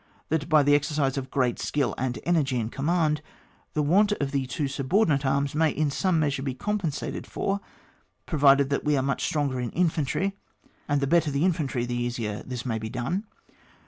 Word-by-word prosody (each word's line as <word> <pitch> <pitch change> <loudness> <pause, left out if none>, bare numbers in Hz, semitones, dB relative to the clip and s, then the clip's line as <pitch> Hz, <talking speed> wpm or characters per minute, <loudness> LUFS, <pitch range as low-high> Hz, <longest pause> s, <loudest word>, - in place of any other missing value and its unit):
That 160 0 -1
by 155 -2 +6
the 145 +1 +4
exercise 145 -2 +1
of 135 -1 -4
great 125 -3 0
skill 135 -7 0
and 125 -2 -2
energy 145 -7 +1
in 110 -1 -2
command, 155 +2 +1 0.5
the 150 - +1
want 200 +8 +4
of 140 -8 -2
the 135 -2 -1
two 140 +3 -2
subordinate 140 +1 +1
arms 140 +1 +1
may 160 +1 +3
in 150 -1 0
some 185 +3 +1
measure 140 -3 0
be 135 -2 -3
compensated 190 -4 -3
for, 195 +1 -1 0.7
provided 140 -3 +4
that 140 - 0
we 150 -1 +2
are 130 - +1
much 140 -1 -1
stronger 140 -4 0
in 125 -1 -2
infantry; 180 +3 0 0.5
and 145 -1 +1
the - - +2
better 160 +1 +3
the 140 +4 +1
infantry 145 -9 0
the 120 - -4
easier 120 -3 -2
this 125 -1 -6
may 115 -3 -1
be 110 0 -5
done. 135 - -2
140 Hz, 190 wpm, -26 LUFS, 130-155 Hz, 0.7 s, by